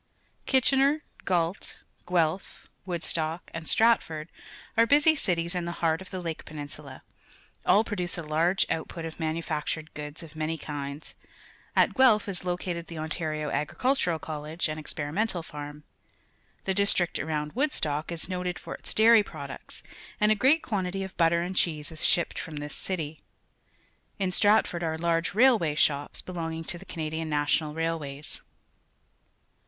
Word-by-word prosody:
Kitchener, 275 +3 +3 0.2
Gait, 175 0 -1 0.2
Guelph, 175 0 0 0.2
Wood 175 -2 -3
jtoek, 160 +1 -1
and 165 -1 -6
Stratford 170 -9 +3 0.5
are 230 +1 +5
busy 295 +4 +6
cities 170 - 0
in 180 -1 -2
the 170 - -3
heart 165 -1 0
of 190 - -10
the 185 - -4
Lake 165 -3 -4
Penin 145 -2 -7
sula; 140 -3 -9 0.6
all 210 - +6
produce 180 -6 -3
a 170 - -4
large 165 +5 +2
output 165 +1 -3
of 165 +1 -7
manufactured 160 -1 -2
goods 150 +2 -7
of 165 -1 -12
many 155 +1 -2
kinds. 145 0 -6 0.6
At - - +4
Guelp 250 -6 +5
h - - -7
is 190 -2 -3
located 175 -1 -3
the 165 - -8
Ontario 155 -1 -2
Agricultural 175 - +1
College 155 +1 -3
and 155 0 -4
Experimental 165 +5 -1
Farm. 150 -1 -8 0.8
The 190 - 0
district 190 -3 +3
around 150 -1 -2
Woodstock 160 - 0
is 170 -1 -3
noted 180 -1 -2
forjts - - -6
dairy 225 0 +7
products, 140 -8 -8 0.4
and 210 0 +4
a - - +7
great 265 +9 +4
quan 200 -5 -1
tity 190 +1 -3
of 190 - -10
butter 170 0 +3
and 185 +2 -4
cheese 155 -4 +1
is 160 - -8
sliipped 170 - +3
from 160 -3 -6
this 145 0 -5
city. 160 -5 -4 1.0
Iii" 190 -2 0
Stratford 205 -3 +3
are_ 160 -1 -1
large 170 +1 0
railway 220 - +5
shops, 145 -1 +1
belonging 165 -2 -4
to 175 +1 -1
the - - -12
Ca - - -9
nadian 160 0 -2
National 150 0 +1
Railways. 155 -3 -3
165 Hz, 155 wpm, -28 LUFS, 155-190 Hz, 1.0 s, dairy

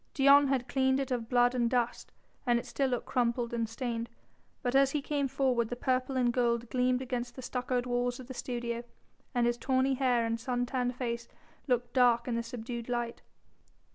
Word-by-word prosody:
Dion 280 0 +6
had 265 -2 0
cleaned 265 +1 +2
it 270 -1 -3
of 235 -2 -2
blood 245 0 +4
and 240 -2 +1
dust, 245 -1 -1 0.4
and 240 -1 +4
it 235 - -3
still 275 -1 0
looked 245 -2 -2
crumpled 240 -1 0
and 230 -2 -1
stained, 230 0 -3 0.5
but 245 -1 0
as 275 0 +6
he 295 - -1
came 285 0 -1
forward 255 -4 +1
the 245 - -3
purple 255 +1 0
and 245 -2 +2
gold 235 -1 0
gleamed 250 0 +1
against 245 -1 -4
the 260 - -8
stuccoed 250 0 -1
walls 245 0 -1
of 255 - -8
the 260 - -8
studio, 240 -1 -3 0.5
and 240 -1 +3
his 240 0 0
tawny 265 0 +2
hair 250 -3 +2
and 230 0 -1
sun 245 +1 -1
tanned 250 0 -1
face 235 -2 -3 0.4
looked 245 -2 0
dark 245 -2 +4
in 245 - -1
the 230 - 0
subdued 235 0 -6
light. 240 -1 -2
245 Hz, 200 wpm, -31 LUFS, 235-260 Hz, 0.5 s, Dion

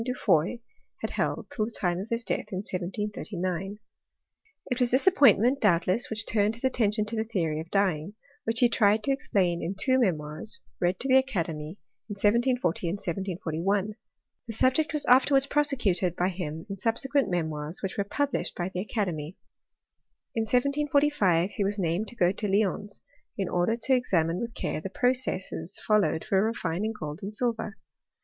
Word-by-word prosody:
du 250 +1 -2
Foy 170 +3 +2 0.4
had - - -3
held - - -2
till 215 - -1
the 230 - -6
time 175 -1 0
of 200 +4 -6
his 230 +1 -1
death 210 - -3
in 190 0 -3
1739. 190 0 -3 0.9
It 250 - 0
was 250 -1 +3
this 255 +3 +2
appointment, 275 - +5
doubtless, 190 +3 +2
'which 220 0 -2
turned 210 0 +1
hit 235 - -11
attention 220 -5 +1
to 220 +2 -4
the 220 - 0
theory 170 -9 -1
of 160 +1 -7
dyeing, 195 -2 0 0.3
which 225 +2 0
he 245 - +7
tried 215 -2 +3
to 275 - +1
explain 185 -10 +1
in 185 +4 -3
two 260 +2 +3
memoirs 160 -3 -2 0.2
read 180 +1 +1
to 270 - -1
the 260 0 +6
academy 170 -10 -2 0.3
in - - -3
1740 205 -4 +1
and 175 - -1
1741. 190 +2 -2 0.5
The 225 - -4
subject 260 +8 +2
was 300 -2 -2
afterwards 270 +2 +5
prosecuted 245 - +1
by 180 +2 +1
him 165 -3 -5
in 200 -1 -5
subsequent 250 +4 +1
memoirs 160 -1 -3
which 190 - -3
were 200 - 0
published 280 +7 -1
1^ 175 +1 -3
the 180 - -2
academy. 180 -6 -3 1.0
In 225 -1 0
1745 280 - +2
he 205 - -1
was 205 +1 -1
named 180 +3 0
to 240 - -10
go 180 -5 +3
to 205 +2 -3
Lyons 205 0 -1 0.3
in 195 - -1
order 180 +6 +1
to 245 +3 0
examine 175 -9 +1
with 235 -1 -5
care - - -3
the 195 - -5
processes 210 -7 -1
followed 210 -6 +2
for 195 0 +2
refining 220 -2 -1
gold 150 +1 -5
and 200 - -5
silver. 220 -1 -2
205 Hz, 170 wpm, -27 LUFS, 175-240 Hz, 1.0 s, he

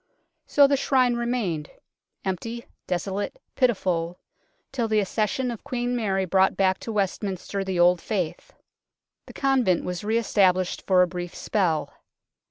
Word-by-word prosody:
So 285 - +6
the 280 0 +3
Shrine 255 -2 +3
remained 235 -11 -2 0.6
empty, 230 +5 -4 0.2
desolate, 195 - -3
pitiful 180 -8 0 0.5
till 245 -4 -1
the 215 -1 +2
accession 215 +5 -1
of 230 - -8
Queen 245 0 -2
Mary 195 -5 0
brought 190 +1 +3
back 190 -1 +2
to 230 - -6
Westminster 195 -1 -2
the 190 -2 -2
old 175 0 +5
faith. 200 - -3 0.8
The - - -11
convent 260 -10 +2
was 180 +2 -4
re 220 +2 +1
established 185 -5 +1
for 185 -1 +5
a - - +1
brief 175 0 -6
spell. 175 -8 0
195 Hz, 140 wpm, -25 LUFS, 180-235 Hz, 0.8 s, So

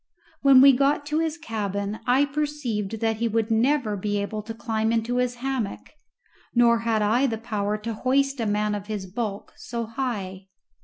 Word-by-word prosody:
When 270 -2 +7
we 275 0 +8
got 280 +3 +2
to 300 +2 0
his 325 -1 -1
cabin 205 - -3
I 260 +3 +4
perceived 275 -8 -3
that 225 -1 +1
he 235 +1 0
would 225 0 0
never 235 -1 +2
be 205 +1 -1
able 210 +1 -3
to 225 +2 -7
climb 220 -1 -1
into 230 +2 0
his 250 -1 0
hammock, 250 -4 -4 0.6
nor 235 -1 +5
had 225 -2 0
I 240 +6 +3
the 225 -3 -2
power 210 -2 -2
to 225 +2 -5
hoist 275 +4 +1
a 225 - 0
man 210 0 0
of 205 -1 -5
his 210 -3 -4
bulk 200 +1 -5
so 235 0 -4
high. 210 -6 -4
225 Hz, 185 wpm, -25 LUFS, 210-260 Hz, 0.6 s, we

